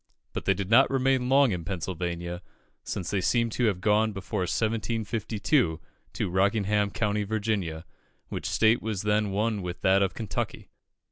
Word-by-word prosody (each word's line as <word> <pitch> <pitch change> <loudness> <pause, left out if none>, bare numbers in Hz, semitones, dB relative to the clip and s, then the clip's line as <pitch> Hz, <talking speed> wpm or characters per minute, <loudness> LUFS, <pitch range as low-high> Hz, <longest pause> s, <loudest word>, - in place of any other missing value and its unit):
But - - -4
they 95 - +3
did 100 0 -4
not 130 +4 +6
remain 130 -1 +1
long 135 -2 +5
in 90 -3 -3
Pennsylvania, 85 -1 -4 0.4
since 95 -3 -4
they 100 -2 0
seem 115 +6 +1
to 120 - 0
have 100 -5 0
gone 105 +2 +2
before 100 +2 -4
1752 110 - 0 0.3
to - - -2
Rockingham, 100 +2 +2
County 105 0 -1
Virginia, 100 -6 -2 0.4
which - - -4
state 110 +1 +3
was 105 -3 -3
then 105 0 +1
one 105 +1 0
with 90 -1 -6
that 95 +1 +4
of 95 -1 0
Kentucky. 110 -4 -4
105 Hz, 155 wpm, -27 LUFS, 95-110 Hz, 0.4 s, not